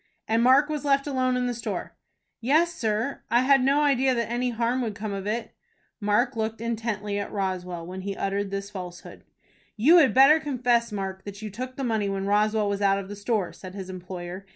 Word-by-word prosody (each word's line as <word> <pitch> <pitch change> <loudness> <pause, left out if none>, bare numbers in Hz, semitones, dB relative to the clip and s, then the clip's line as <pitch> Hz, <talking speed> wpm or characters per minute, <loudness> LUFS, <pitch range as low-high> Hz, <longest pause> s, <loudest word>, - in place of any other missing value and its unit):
"And 225 +1 +2
Mark 260 +4 +5
was 300 -1 -3
left 275 -1 +2
alone 255 -3 0
in 250 - 0
the 245 - -1
store?" 235 - -5 0.4
"Yes, 315 +8 +2
sir. 225 -1 -2
I 240 +2 +4
had 270 0 +4
no 280 +3 +3
idea 265 -2 +3
that 235 -1 -2
any 245 +1 0
harm 240 +2 0
would 220 -4 -3
come 210 0 -4
of 195 0 -5
it." 225 +2 -3 0.5
Mark 225 +5 +1
looked 220 0 -2
intently 220 -3 -2
at 200 - -5
Roswell 180 -3 -3
when 185 +2 -7
he 195 +1 -5
uttered 195 0 -1
this 200 +1 -5
falsehood. 180 -3 -9 0.5
"You 300 +11 +6
had 295 -7 +5
better 275 +4 +7
confess, 245 -6 +1
Mark, 190 -2 -4
that 205 +1 -8
you 215 - -5
took 255 +5 -6
the 275 - -4
money 220 -4 0
when 195 0 -2
Roswell 210 +1 +2
was 200 0 -2
out 195 -1 +3
of 195 -1 -6
the 205 - -6
store," 205 -2 -1
said 185 0 -10
his 190 -2 -6
employer. 185 +1 -7
220 Hz, 210 wpm, -26 LUFS, 200-255 Hz, 0.5 s, better